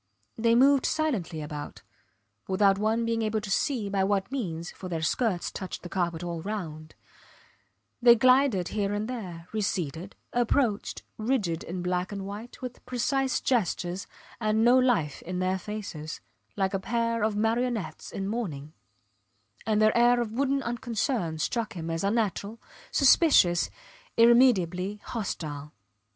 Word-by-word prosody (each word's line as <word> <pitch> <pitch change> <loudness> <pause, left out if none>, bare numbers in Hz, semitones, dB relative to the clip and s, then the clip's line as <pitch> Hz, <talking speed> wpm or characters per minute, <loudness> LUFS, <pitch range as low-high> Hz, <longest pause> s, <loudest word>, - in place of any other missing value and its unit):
They 230 0 +3
moved 270 +2 +5
silently 195 - -1
about, 150 0 -7 0.6
without 195 0 +3
one 220 +2 +1
being 230 0 0
able 215 0 0
to 210 -2 -6
see 230 0 0
by 195 -1 0
what 195 +2 0
means, 175 -11 -3
for 185 - -8
their 165 -2 -3
skirts 185 +1 0
touched 185 -2 -6
the 175 - -7
carpet 175 -2 -1
all 170 -2 -4
round; 160 -6 -6 1.1
they 235 -1 +8
glided 255 -6 +4
here 205 -1 -1
and 210 +1 -2
there, 180 -9 -6
receded, 185 -4 -3 0.2
approached, 240 -2 0 0.2
rigid 215 -8 0
in 175 +1 -5
black 180 +1 -1
and 200 -1 -5
white, 210 +6 -8
with 250 0 -7
precise 265 +1 0
gestures, 195 -7 -1 0.3
and 215 0 +1
no 245 +1 +6
life 220 - +1
in 180 +1 -5
their 185 +1 0
faces, 185 -7 -6 0.4
like 190 0 0
a 195 - 0
pair 230 +2 -1
of 215 0 +1
marionettes 225 -5 -1
in 195 0 -4
mourning; 160 -10 -4 0.9
and 215 -1 +2
their 215 0 +4
air 240 +1 +5
of 235 -3 -2
wooden 275 +3 0
unconcern 235 - -2
struck 225 +7 -2
him 165 -2 -5
as 165 +2 -2
unnatural, 210 +1 -1 0.3
suspicious, 255 - +5 0.5
irremediably 210 -5 +4
hostile. 150 -9 -5
210 Hz, 140 wpm, -27 LUFS, 180-235 Hz, 1.1 s, they